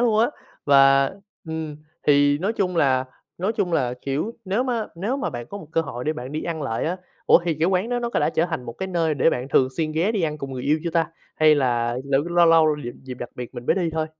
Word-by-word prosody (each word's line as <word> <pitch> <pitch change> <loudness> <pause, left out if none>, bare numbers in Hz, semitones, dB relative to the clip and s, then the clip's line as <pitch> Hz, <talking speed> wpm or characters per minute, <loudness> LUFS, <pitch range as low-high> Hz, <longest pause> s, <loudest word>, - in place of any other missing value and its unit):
luôn 230 -3 +3
á, 225 - +5 0.4
và 135 -1 +5 0.4
ừm, 160 -2 -4 0.3
thì 145 0 +4
nói 195 +7 0
chung 185 -5 -1
là 130 -4 +3 0.3
nói 190 +5 0
chung 180 -5 -1
là, 125 -6 +1
kiểu, 140 +11 -2
nếu 200 +5 0
má 235 -4 -1
nếu 205 +10 -2
mà 280 - -2
bạn 120 -1 -6
có 200 - -7
một 190 - -11
cơ 165 - +2
hội 125 -6 -5
để 155 - +1
bạn 130 -2 -7
đi 155 - -3
ăn 165 -3 -3
lại 115 -5 -2
á 175 +3 -1 0.3
ủa, - - +7
thì 170 -2 0
cái 165 - +4
quán 190 +3 +1
đó 245 0 0
nó 240 0 -2
đã - - +2
trở 165 +1 +1
thành 160 -8 -4
một 115 - -6
cái 190 - -5
nơi 165 -4 0
để 145 +4 +3
bạn 125 -2 -3
thường 130 -2 +3
xuyên 155 -1 -1
ghé 175 +8 +1
đi 205 -5 -1
ăn 150 -2 -1
cùng 140 -2 -6
người 125 -1 -5
yêu 150 +4 +2
chưa 170 - -1
ta, 165 -1 +2 0.3
hay 155 -1 +6
là 120 -4 +1
lấu 140 0 +2
lâu 175 +1 +3
lâu 160 -2 +5
dịp 120 - -4
dịp 130 -1 -7
đặc 120 -1 -7
biệt 125 -1 -7
mình 120 0 -8
mới - - +4
đi 175 -4 0
thôi? 160 -1 -1
155 Hz, 270 wpm, -23 LUFS, 135-180 Hz, 0.4 s, ủa